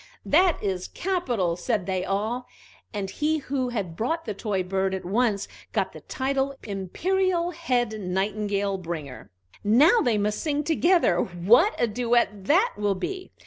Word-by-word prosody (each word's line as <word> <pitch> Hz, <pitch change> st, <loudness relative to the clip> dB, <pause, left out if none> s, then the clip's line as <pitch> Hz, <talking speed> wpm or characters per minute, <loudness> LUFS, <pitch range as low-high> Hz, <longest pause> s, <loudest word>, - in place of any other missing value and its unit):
"That 350 Hz, +2 st, +4 dB
is 190 Hz, -3 st, -2 dB
capital!" 245 Hz, -, -1 dB
said 200 Hz, +1 st, -1 dB
they 185 Hz, -1 st, -1 dB
all, 220 Hz, +6 st, -2 dB, 0.4 s
and 205 Hz, -3 st, -3 dB
he 305 Hz, +9 st, 0 dB
who 270 Hz, -3 st, -2 dB
had 200 Hz, -9 st, -3 dB
brought 325 Hz, -, -2 dB
the 215 Hz, -, -3 dB
toy 200 Hz, -2 st, -2 dB
bird 190 Hz, +1 st, -1 dB
at 190 Hz, -, -6 dB
once 210 Hz, +1 st, +1 dB, 0.3 s
got -, -, 0 dB
the -, -, -9 dB
title 270 Hz, +1 st, -1 dB
Imperial 345 Hz, -, 0 dB
Head 250 Hz, -9 st, 0 dB
Nightingale 200 Hz, +1 st, -1 dB
Bringer. 160 Hz, -7 st, -6 dB, 0.3 s
"Now 285 Hz, -, +5 dB
they 235 Hz, -4 st, +2 dB
must 210 Hz, +1 st, -1 dB
sing 295 Hz, -1 st, 0 dB
together: 330 Hz, -, +3 dB
what 220 Hz, -, +3 dB
a -, -, +3 dB
duet 235 Hz, -3 st, 0 dB
that 385 Hz, -, +4 dB
will 205 Hz, -1 st, +1 dB
be!" 375 Hz, -, -5 dB
220 Hz, 150 wpm, -25 LUFS, 195-295 Hz, 0.4 s, Now